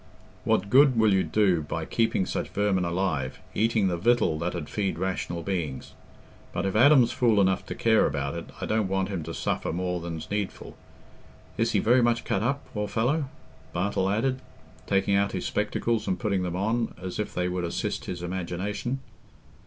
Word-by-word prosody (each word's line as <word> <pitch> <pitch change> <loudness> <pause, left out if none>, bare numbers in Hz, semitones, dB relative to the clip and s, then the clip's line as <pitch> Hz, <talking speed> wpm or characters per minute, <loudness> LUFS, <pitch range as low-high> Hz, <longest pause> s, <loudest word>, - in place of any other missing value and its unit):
What 100 +2 +1
good 135 -1 +6
will 110 -2 +4
you 95 - +3
do 95 -6 +2
by 80 +2 -4
keeping 110 -3 +1
such - - -3
vermin 100 -3 +1
alive, 85 -7 -1 0.2
eating 110 -2 +2
the 90 -2 0
victual 90 -5 +2
that 90 +2 -2
'ud 80 -4 -4
feed 95 -5 -2
rational 85 -2 -2
beings? 80 -8 -3 0.6
But - - -1
if 95 - -1
Adam's 125 0 +6
fool 115 -4 +3
enough 95 -1 +2
to - - -5
care 110 -1 +4
about 70 -1 -2
it, 85 0 -5
I - - -3
don't 110 -2 +1
want 95 0 0
him 95 -4 -3
to - - -6
suffer - - -1
more 90 +1 -2
than's 80 -1 -6
needful.... 105 -2 -4 0.8
Is - - 0
he - - +3
very 125 +3 +4
much 120 -1 +1
cut 95 - 0
up, 140 +5 -1
poor 105 -1 -2
fellow?" 135 +9 +1 0.5
Bartle 95 +1 0
added, 130 +6 0 0.5
taking 100 0 +2
out 100 0 +1
his 90 - -3
spectacles 110 +1 -1
and 95 - 0
putting 100 -3 0
them 90 -1 -2
on, 110 +5 -1
as 90 +1 -5
if 105 - -3
they 90 0 0
would 90 0 -2
assist 85 - -3
his 90 -1 -5
imagination. 95 +8 -3
95 Hz, 185 wpm, -27 LUFS, 90-110 Hz, 0.8 s, good